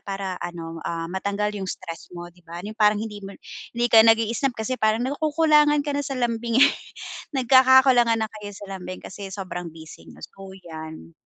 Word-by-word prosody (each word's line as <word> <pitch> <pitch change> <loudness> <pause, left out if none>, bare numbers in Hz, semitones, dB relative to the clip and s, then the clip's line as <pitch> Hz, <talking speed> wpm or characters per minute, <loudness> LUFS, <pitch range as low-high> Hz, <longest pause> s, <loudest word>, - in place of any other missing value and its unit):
para 195 -2 -5
ano, 165 -1 -6
ah, 165 -1 -3
matanggal 200 +2 -2
yung 195 -2 -5
stress 165 -3 -7
mo, 175 0 -8
'di 180 - -23
ba? 170 +3 -8
Yung 215 - -6
parang 210 0 +4
hindi 210 -1 -6
mo 195 0 -9 0.4
hindi 240 - +2
ka 225 - +9
nag-iisip 230 +3 +3
kasi 235 +4 -3
parang 215 +2 +2
nakukulangan 300 0 +3
ka 290 - -2
na 285 - -1
sa 275 -1 -4
lambing, 235 -1 -1
eh. 285 - +3 0.6
Nagkakakulangan 260 -2 +5
na - - -5
kayo 205 -1 -8
sa - - -9
lambing 185 0 -8
kasi 195 +1 -8
sobrang 185 -3 -6
busy 160 -1 -13
niyo, - - -11
so 195 0 -12
'yan. 160 - -10
210 Hz, 185 wpm, -24 LUFS, 185-245 Hz, 0.6 s, ka